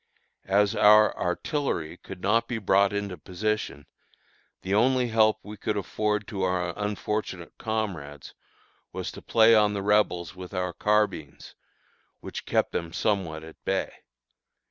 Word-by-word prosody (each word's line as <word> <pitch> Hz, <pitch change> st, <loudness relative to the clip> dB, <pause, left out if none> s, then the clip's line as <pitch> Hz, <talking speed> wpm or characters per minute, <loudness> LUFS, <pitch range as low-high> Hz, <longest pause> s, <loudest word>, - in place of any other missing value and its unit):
As 100 Hz, +1 st, +3 dB
our 105 Hz, +1 st, +6 dB
artillery 90 Hz, -, -2 dB
could -, -, -10 dB
not 115 Hz, +4 st, +2 dB
be 120 Hz, -, -2 dB
brought 100 Hz, -1 st, +3 dB
into 100 Hz, -4 st, -4 dB
position, 95 Hz, -5 st, -3 dB, 0.8 s
the 95 Hz, -, -2 dB
only 125 Hz, +3 st, +3 dB
help 110 Hz, -1 st, +4 dB
we 105 Hz, +1 st, -9 dB
could 105 Hz, 0 st, -2 dB
afford 105 Hz, +1 st, -1 dB
to 100 Hz, -3 st, -4 dB
our 90 Hz, -2 st, 0 dB
unfortunate 105 Hz, -3 st, -3 dB
comrades 90 Hz, -11 st, -4 dB, 0.6 s
was -, -, -5 dB
to -, -, -11 dB
play 115 Hz, 0 st, +5 dB
on 105 Hz, -2 st, +4 dB
the 100 Hz, -, -3 dB
Rebels 100 Hz, -4 st, +1 dB
with 90 Hz, +1 st, -9 dB
our 90 Hz, -1 st, -2 dB
carbines, 105 Hz, -8 st, -1 dB, 0.7 s
which -, -, -8 dB
kept -, -, +1 dB
them 85 Hz, -1 st, -3 dB
somewhat 90 Hz, -6 st, -1 dB
at 80 Hz, 0 st, -13 dB
bay. -, -, -1 dB
105 Hz, 140 wpm, -26 LUFS, 90-110 Hz, 0.8 s, our